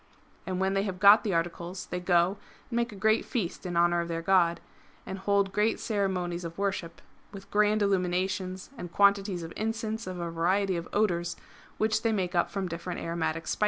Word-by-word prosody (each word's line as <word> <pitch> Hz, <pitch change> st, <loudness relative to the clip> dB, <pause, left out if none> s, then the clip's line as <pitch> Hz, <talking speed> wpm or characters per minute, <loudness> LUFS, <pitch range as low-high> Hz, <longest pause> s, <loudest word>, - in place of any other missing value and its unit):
And 185 Hz, -1 st, -2 dB
when 190 Hz, 0 st, +1 dB
they 195 Hz, -, +2 dB
have 190 Hz, -3 st, -4 dB
got 205 Hz, +2 st, +8 dB
the 200 Hz, -5 st, 0 dB
articles 170 Hz, +2 st, -3 dB
they 180 Hz, -, -4 dB
go 180 Hz, +2 st, +2 dB, 0.3 s
and -, -, -2 dB
make 235 Hz, 0 st, 0 dB
a -, -, -9 dB
great 215 Hz, +3 st, +2 dB
feast 190 Hz, -5 st, -3 dB
in 175 Hz, -1 st, -2 dB
honour 175 Hz, 0 st, +3 dB
of 170 Hz, -, -4 dB
their 165 Hz, 0 st, -3 dB
god, 170 Hz, -2 st, +3 dB, 0.5 s
and 190 Hz, 0 st, -5 dB
hold 200 Hz, 0 st, +1 dB
great 210 Hz, +3 st, +1 dB
ceremonies 185 Hz, -5 st, -1 dB
of 165 Hz, 0 st, -7 dB
worship 195 Hz, -4 st, -3 dB, 0.3 s
with 195 Hz, -1 st, -11 dB
grand 210 Hz, 0 st, +3 dB
illuminations 185 Hz, +1 st, -1 dB
and 175 Hz, -, -6 dB
quantities 200 Hz, -3 st, +3 dB
of 165 Hz, -, -7 dB
incense 220 Hz, 0 st, -3 dB
of 185 Hz, -1 st, -5 dB
a 170 Hz, -1 st, -3 dB
variety 185 Hz, +4 st, +1 dB
of 170 Hz, 0 st, -4 dB
odours, 175 Hz, -5 st, 0 dB, 0.4 s
which 215 Hz, 0 st, +1 dB
they 230 Hz, -, +1 dB
make 190 Hz, -4 st, -1 dB
up 175 Hz, -, +2 dB
from 195 Hz, -2 st, -3 dB
different 175 Hz, +1 st, -5 dB
aromatic 165 Hz, -1 st, -2 dB
spices. -, -, -3 dB
190 Hz, 195 wpm, -28 LUFS, 175-205 Hz, 0.5 s, got